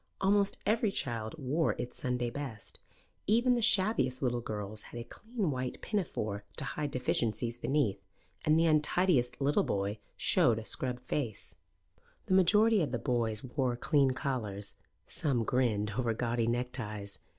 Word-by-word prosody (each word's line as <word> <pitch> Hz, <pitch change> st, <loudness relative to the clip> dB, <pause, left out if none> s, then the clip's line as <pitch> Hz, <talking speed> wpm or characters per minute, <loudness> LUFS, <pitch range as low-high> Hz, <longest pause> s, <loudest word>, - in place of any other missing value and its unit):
Almost 200 Hz, 0 st, +2 dB
every 220 Hz, 0 st, +2 dB
child 115 Hz, -, -3 dB
wore 150 Hz, +3 st, 0 dB
its 125 Hz, -, -6 dB
Sunday 125 Hz, -1 st, -1 dB
best. 130 Hz, -7 st, -7 dB, 0.5 s
Even 240 Hz, +4 st, +4 dB
the 240 Hz, -, +1 dB
shabbiest 190 Hz, -, +3 dB
little 120 Hz, -2 st, +1 dB
girls 105 Hz, -1 st, -5 dB
had 120 Hz, -, -7 dB
a -, -, -4 dB
clean 210 Hz, -, -3 dB
white 130 Hz, -1 st, -3 dB
pinafore 110 Hz, -, -2 dB
to 155 Hz, -, -3 dB
hide 145 Hz, +2 st, -3 dB
deficiencies 120 Hz, -2 st, 0 dB
beneath, 120 Hz, -9 st, +1 dB, 0.4 s
and 155 Hz, +1 st, +4 dB
the 165 Hz, -, +4 dB
untidiest 150 Hz, -5 st, +2 dB
little 140 Hz, +1 st, +3 dB
boy 100 Hz, +2 st, -1 dB, 0.2 s
showed 115 Hz, -, +3 dB
a 110 Hz, -, -5 dB
scrubbed 125 Hz, 0 st, -3 dB
face. 125 Hz, -5 st, -3 dB, 0.7 s
The 190 Hz, -, 0 dB
majority 210 Hz, +3 st, +5 dB
of 145 Hz, -6 st, -1 dB
the 120 Hz, -, 0 dB
boys 115 Hz, -4 st, -1 dB
wore 130 Hz, -1 st, -1 dB
clean 140 Hz, +2 st, +3 dB
collars; 120 Hz, -7 st, -2 dB, 0.3 s
some 130 Hz, -6 st, 0 dB
grinned 110 Hz, -4 st, +1 dB
over 115 Hz, -3 st, +1 dB
gaudy 115 Hz, 0 st, 0 dB
neckties. 115 Hz, -5 st, -3 dB
125 Hz, 150 wpm, -32 LUFS, 115-155 Hz, 0.7 s, majority